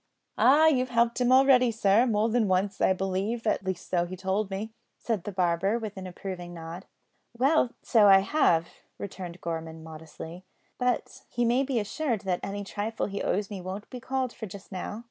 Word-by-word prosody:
"Ah! 295 +4 +6
you've 255 -5 +3
helped 235 +1 +1
him 245 0 +3
already, 260 -1 +6
sir, 225 +1 +3
more 215 -1 +2
than 230 -1 +2
once, 190 +1 0
I - - +4
believe; 195 +5 -2
at 215 - +1
least 190 -2 -4
so 175 -1 0
he 185 +1 -7
told 190 +2 -1
me," 205 +3 -5 0.2
said 215 -7 -3
the 205 - -3
barber, 185 +3 +1
with 215 -3 -6
an 190 -1 -7
approving 180 -1 -7
nod. 165 +3 -8 0.5
"Well, 270 +1 +3
so 220 -4 +5
I 195 -1 +8
have," 175 - +2 0.3
returned 180 -3 -7
Gorman 160 -1 -5
modestly, 160 +2 -10 0.4
"but 250 -1 -1
he 240 0 0
may 240 +3 +3
be 265 -3 0
assured 225 +1 -2
that 185 -3 -1
any 200 +1 -4
trifle 210 +2 -3
he 200 0 -4
owes 200 +2 -1
me 195 -2 -5
won't 190 +3 -6
be 250 - -6
called 260 0 -2
for 220 - -7
just 200 +2 -11
now. 190 +3 -5
200 Hz, 190 wpm, -28 LUFS, 185-235 Hz, 0.5 s, I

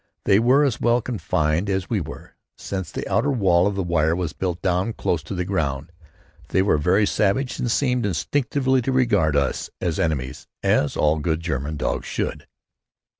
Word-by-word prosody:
They 100 - +5
were 130 +5 +4
as 130 -5 0
well 120 +1 +3
confined 95 -7 -1
as 95 -1 -1
we 110 - 0
were, 75 - -9 0.2
since 95 -3 -5
the - - -5
outer 145 - +1
wall 95 -8 +3
of 100 -1 -2
wire 85 -3 +1
was 85 -4 -3
built 90 -2 -3
down 90 +5 0
close 85 -5 -1
to 100 - -6
the 90 -1 -2
ground. 80 -5 -2 0.6
They 95 - +2
were 95 -6 +2
very 95 +7 +3
savage 110 +6 0
and 120 - -1
seemed 125 -3 +1
instinctively 130 - 0
to 135 - -1
regard 105 - +2
us 70 -2 0
as 85 -3 -2
enemies; 75 -2 -2 0.2
as 75 - +2
all 75 +1 +2
good 80 +1 -1
German 75 -2 -3
dogs - - -2
should. - - -3
95 Hz, 175 wpm, -23 LUFS, 80-115 Hz, 0.6 s, They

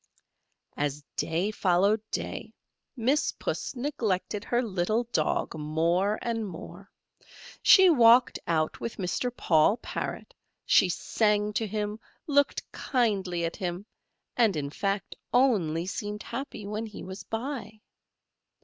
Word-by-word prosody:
As 145 0 -2
day 175 +6 0
followed 200 +2 +2
day, - - -5 0.4
Miss 260 +5 +1
Puss - - -4
neglected 225 -7 -2
her 240 +1 0
little 215 +2 0
Dog 155 - 0
more 165 +6 +1
and 225 -2 -2
more. 185 +2 -10 0.7
She 380 -1 +8
walked 245 -5 +6
out 155 -2 0
with 230 - -5
Mr. 190 +6 -1
Paul 160 +7 +4
Parrot, - - -5 0.3
she 185 - +5
sang 210 +3 +1
to 220 +1 -1
him, 210 +1 -3 0.3
looked 285 -1 +2
kindly 195 -9 0
at 165 - -4
him, 180 0 -4 0.5
and, 225 -6 +3
in 140 -2 -3
fact, 195 +3 -2 0.2
only 185 -11 +2
seemed 205 +2 -4
happy 235 -4 -6
when 215 +2 -4
he 215 - -9
was 190 +1 -7
by. 225 -2 -5
210 Hz, 120 wpm, -28 LUFS, 175-230 Hz, 0.7 s, She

